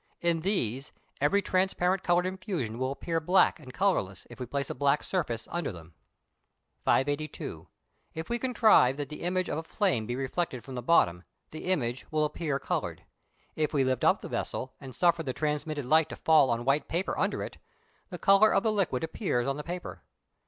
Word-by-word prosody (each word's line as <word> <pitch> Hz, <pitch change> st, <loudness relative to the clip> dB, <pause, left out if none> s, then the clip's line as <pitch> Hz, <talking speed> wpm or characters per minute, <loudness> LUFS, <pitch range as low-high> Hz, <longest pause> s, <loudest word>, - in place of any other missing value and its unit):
In 170 Hz, -1 st, +1 dB
these 145 Hz, -, -2 dB, 0.3 s
every 200 Hz, +8 st, +3 dB
transparent 185 Hz, 0 st, +1 dB
coloured 175 Hz, 0 st, +2 dB
infusion 185 Hz, -, -3 dB
will 130 Hz, +1 st, 0 dB
appear 165 Hz, +4 st, -2 dB
black 180 Hz, +4 st, +3 dB
and 130 Hz, -, -11 dB
colourless 150 Hz, -, 0 dB
if 120 Hz, -, -11 dB
we 125 Hz, -, -4 dB
place 140 Hz, +2 st, -2 dB
a -, -, -2 dB
black 140 Hz, +3 st, +1 dB
surface 135 Hz, -12 st, -2 dB
under 170 Hz, -6 st, -2 dB
them. 85 Hz, -2 st, -12 dB, 0.9 s
582. 145 Hz, +3 st, -1 dB, 0.5 s
If 160 Hz, +1 st, -5 dB
we 240 Hz, 0 st, -1 dB
contrive 220 Hz, -, +4 dB
that 145 Hz, -2 st, -4 dB
the 150 Hz, -, -8 dB
image 180 Hz, +1 st, 0 dB
of -, -, -2 dB
a -, -, -6 dB
flame 165 Hz, -, 0 dB
be 120 Hz, -, -2 dB
reflected 135 Hz, 0 st, -2 dB
from 135 Hz, -, -9 dB
the 125 Hz, -, -4 dB
bottom, 90 Hz, -, +3 dB, 0.3 s
the 155 Hz, -, -8 dB
image 130 Hz, -9 st, -1 dB
will 155 Hz, -1 st, +1 dB
appear 150 Hz, -2 st, -2 dB
coloured. -, -, -3 dB, 0.5 s
If 155 Hz, 0 st, -1 dB
we 135 Hz, -, +4 dB
lift 130 Hz, -2 st, 0 dB
up -, -, +3 dB
the -, -, -5 dB
vessel 130 Hz, -, -4 dB
and 130 Hz, -3 st, -9 dB
suffer 170 Hz, -2 st, +3 dB
the 135 Hz, -5 st, -3 dB
transmitted 150 Hz, 0 st, -2 dB
light 155 Hz, +4 st, +4 dB
to -, -, -6 dB
fall 155 Hz, -4 st, +4 dB
on 120 Hz, 0 st, -1 dB
white 140 Hz, +3 st, +2 dB
paper 175 Hz, +3 st, -1 dB
under -, -, 0 dB
it, -, -, -8 dB, 0.5 s
the -, -, -6 dB
colour 195 Hz, +2 st, +5 dB
of 195 Hz, -, +3 dB
the 220 Hz, -, +2 dB
liquid 190 Hz, -11 st, 0 dB
appears 160 Hz, -, -1 dB
on 135 Hz, -, 0 dB
the 150 Hz, -, -5 dB
paper. 175 Hz, +2 st, -6 dB
155 Hz, 195 wpm, -29 LUFS, 130-180 Hz, 0.9 s, colour